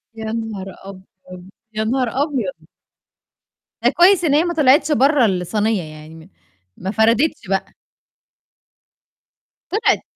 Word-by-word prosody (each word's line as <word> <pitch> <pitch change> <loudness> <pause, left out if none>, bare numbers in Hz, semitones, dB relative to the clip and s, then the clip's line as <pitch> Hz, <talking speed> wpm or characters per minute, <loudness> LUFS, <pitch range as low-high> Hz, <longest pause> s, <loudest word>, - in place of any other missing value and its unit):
يا 220 - -7
نهار 220 -4 -5 0.2
أبيض! 185 -1 -13 0.2
يا 215 - -1
نهار 250 +3 0 0.2
أبيض! 200 - -4 1.2
ده - - +5
كويس 360 +1 +4
إن 295 - +2
هي 305 +3 +4
ما 345 -1 -2
طلعتش 295 0 +3
برّا 280 -1 +3
الصينية 205 +1 -1
يعني، 155 +1 -12
م 190 - -21 0.5
ما 190 +2 -4
فردِتش 230 +6 +1
بقى. 195 0 -2 2.0
طلعِت! 420 +4 +1
220 Hz, 120 wpm, -19 LUFS, 190-285 Hz, 2.0 s, ده